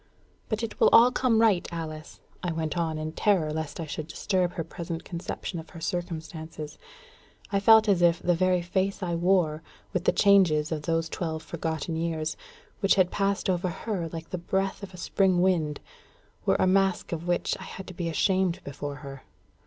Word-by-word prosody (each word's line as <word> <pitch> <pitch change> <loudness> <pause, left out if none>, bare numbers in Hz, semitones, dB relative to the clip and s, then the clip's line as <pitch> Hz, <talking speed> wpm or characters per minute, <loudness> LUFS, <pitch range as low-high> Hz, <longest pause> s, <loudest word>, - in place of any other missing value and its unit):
"But 220 +1 -1
it 225 - -5
will - - +6
all 240 +2 +8
come 250 -3 +2
right, 210 -6 +3
Alice," 155 -2 -7 0.2
I 175 - -2
went 160 0 -2
on 165 -2 -1
in 155 0 -4
terror 165 -4 +1
lest 160 0 -4
I 165 - -3
should 155 0 -5
disturb 180 +2 0
her 165 - -3
present 165 0 -6
conception 170 0 -5
of 160 - -10
her 165 - -10
circumstances. 160 -2 -5 0.7
I 200 - +2
felt 220 +2 +7
as 195 -4 +3
if 170 -1 +4
the 175 - +2
very 180 0 +2
face 190 +3 -1
I 175 -1 -1
wore, 170 -3 +2 0.3
with 180 -1 -1
the - - +5
changes 175 -7 +4
of 155 -2 -2
those 165 +1 0
twelve 160 -1 -4
forgotten 160 0 -3
years, 160 -1 -2 0.4
which 195 - +4
had 185 -2 +3
passed 200 0 0
over 180 -1 0
her 175 -2 -3
like 165 0 -8
the 180 - -3
breath 190 +4 -1
of 200 -2 -8
a 180 - -11
spring 185 +1 +2
wind, 165 -5 +1 0.7
were - - +4
a - - +3
mask 190 0 +2
of 170 0 -4
which 175 0 +1
I - - -8
had 190 - -8
to 185 - -9
be 170 -1 -3
ashamed 185 +1 +1
before 145 +1 -5
her. 135 -1 -8
175 Hz, 190 wpm, -27 LUFS, 160-190 Hz, 0.7 s, all